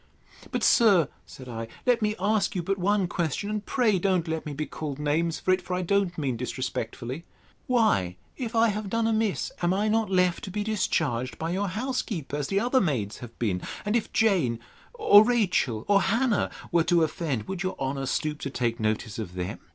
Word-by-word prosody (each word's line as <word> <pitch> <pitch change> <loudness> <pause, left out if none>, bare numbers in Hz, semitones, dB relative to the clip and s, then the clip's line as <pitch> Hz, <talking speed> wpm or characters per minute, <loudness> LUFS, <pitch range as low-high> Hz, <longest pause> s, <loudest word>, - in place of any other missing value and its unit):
But, - - -2
sir, 195 - +5 0.2
said 130 - -11
I, 115 -1 -5 0.2
let 245 -2 +3
me 210 0 +1
ask 210 +2 +1
you 180 - -1
but 195 +2 -1
one 200 +1 +2
question, 170 +4 -2
and 210 -1 -2
pray 220 -7 +2
don't 185 -2 +1
let 160 -1 -3
me 150 - -4
be 155 +2 -2
called 150 -3 -5
names 155 +3 0
for 185 - +1
it; 185 0 +2
for 180 - -3
I 180 - -1
don't 195 -1 +1
mean 135 -6 -1
disrespectfully: 125 +2 -4 0.4
Why, 215 - +2 0.2
if 235 -3 -5
I 225 0 +5
have 210 -1 -3
done 230 +2 0
amiss, 220 -2 0
am 175 +1 +2
I 210 +2 +1
not 220 -1 +1
left 180 -2 +2
to - - -6
be 205 +2 -2
discharged 150 - -1
by 165 +1 -3
your 200 +3 0
housekeeper, 210 - -3
as 145 -1 -2
the 195 - +1
other 250 +4 +2
maids 120 - -1
have 120 -1 -10
been? 95 -6 -1 0.2
And 210 +2 0
if 235 - 0
Jane, 180 - +2 0.4
or 215 - +7
Rachel, 190 - +1
or 200 -1 +5
Hannah, 230 +4 +1 0.2
were 170 -1 +4
to 175 -1 +4
offend, 150 -7 -2
would 190 -2 -4
your 185 -1 -2
honour 135 0 -2
stoop 150 +2 -1
to 140 - -4
take 120 -3 -1
notice 110 0 -1
of 90 -5 -6
them? 90 +4 -4
180 Hz, 205 wpm, -27 LUFS, 135-210 Hz, 0.4 s, or